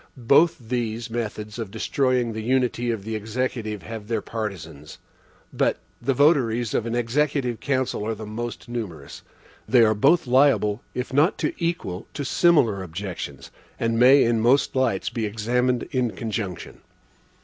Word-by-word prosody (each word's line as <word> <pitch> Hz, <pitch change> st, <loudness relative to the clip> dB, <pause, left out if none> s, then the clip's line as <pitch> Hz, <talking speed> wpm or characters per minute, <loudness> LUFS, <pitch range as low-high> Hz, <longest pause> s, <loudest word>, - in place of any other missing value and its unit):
(1) 125 Hz, -4 st, -14 dB
Both 160 Hz, +7 st, +5 dB
these 115 Hz, -1 st, -3 dB
methods 110 Hz, -1 st, -4 dB
of 110 Hz, -4 st, -4 dB
destroying 125 Hz, +1 st, 0 dB
the 110 Hz, -, -4 dB
unity 125 Hz, 0 st, 0 dB
of 110 Hz, -4 st, -2 dB
the 110 Hz, +1 st, -4 dB
Executive 110 Hz, -1 st, -3 dB
have 110 Hz, -2 st, -7 dB
their 115 Hz, -, 0 dB
partisans; 95 Hz, -9 st, -6 dB, 0.6 s
but -, -, +1 dB, 0.2 s
the 135 Hz, -, 0 dB
votaries 120 Hz, -6 st, +3 dB
of 115 Hz, -, 0 dB
an 115 Hz, -, -2 dB
executive 125 Hz, 0 st, 0 dB
council 130 Hz, -6 st, -1 dB
are 115 Hz, -, -1 dB
the 110 Hz, +1 st, -8 dB
most 120 Hz, +4 st, -6 dB
numerous. 100 Hz, -12 st, -6 dB, 0.5 s
They 125 Hz, -3 st, +6 dB
are 110 Hz, -1 st, +4 dB
both 140 Hz, +11 st, +3 dB
liable, 125 Hz, -5 st, +3 dB
if 125 Hz, 0 st, -4 dB
not 150 Hz, +7 st, +3 dB
to -, -, -1 dB
equal, 165 Hz, -, -3 dB
to 145 Hz, -, -3 dB
similar 130 Hz, -, +3 dB
objections, 95 Hz, +1 st, -6 dB, 0.3 s
and 115 Hz, 0 st, 0 dB
may 130 Hz, +3 st, +7 dB
in 115 Hz, -1 st, +2 dB
most 130 Hz, +6 st, +3 dB
lights 125 Hz, -7 st, 0 dB
be 115 Hz, -2 st, -2 dB
examined 120 Hz, +3 st, 0 dB
in 125 Hz, -3 st, +1 dB
conjunction. 105 Hz, -5 st, -5 dB
115 Hz, 155 wpm, -24 LUFS, 110-130 Hz, 0.6 s, may